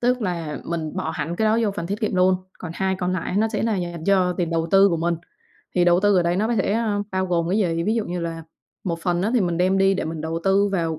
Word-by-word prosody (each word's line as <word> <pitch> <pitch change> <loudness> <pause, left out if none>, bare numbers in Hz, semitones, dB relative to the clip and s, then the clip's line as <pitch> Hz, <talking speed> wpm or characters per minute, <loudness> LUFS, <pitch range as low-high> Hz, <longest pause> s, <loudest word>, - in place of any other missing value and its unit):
tức 250 0 +1
là 170 -6 -3
mình 165 -2 -4
bỏ 160 - -2
hẳn 165 +1 -4
cái 220 - +1
đó 220 +1 +3
vô 210 - +1
phần 170 - -3
tiết 200 +3 -4
kiệm 215 - -1
luôn. 185 0 +4 0.2
Còn 180 - -7
2 190 0 0
còn 180 0 -1
lại 185 +1 -2
nó 220 +2 +2
sẽ 215 -2 -2
là 225 -3 +1
dành 175 -2 -4
cho 185 -2 +3
tiền 175 -2 -2
đầu 165 0 0
tư 195 +1 +6
của 170 - 0
mình. 170 +1 0 0.6
Thì 175 -1 +3
đầu 175 0 +4
tư 205 -1 +3
ở 180 - +4
đây 170 +1 0
nó 215 +4 +1
có 240 - +1
thể, 195 - +1
a, 220 -2 0
bao 190 0 0
gồm 170 -1 0
cái 200 - +2
gì? 165 -5 0
Ví 215 - +1
dụ 225 -2 0
như 175 0 -4
là 165 -1 -4 0.4
một 170 -2 -2
phần 175 0 0
á, 210 - +1
thì 240 - +4
mình 175 -2 0
đem 185 +2 +2
đi 195 0 +4
để - - -2
mình 160 -1 -4
đầu 160 +1 -3
tư 200 +1 +3
vào 165 -4 -1
180 Hz, 300 wpm, -23 LUFS, 170-200 Hz, 0.6 s, tư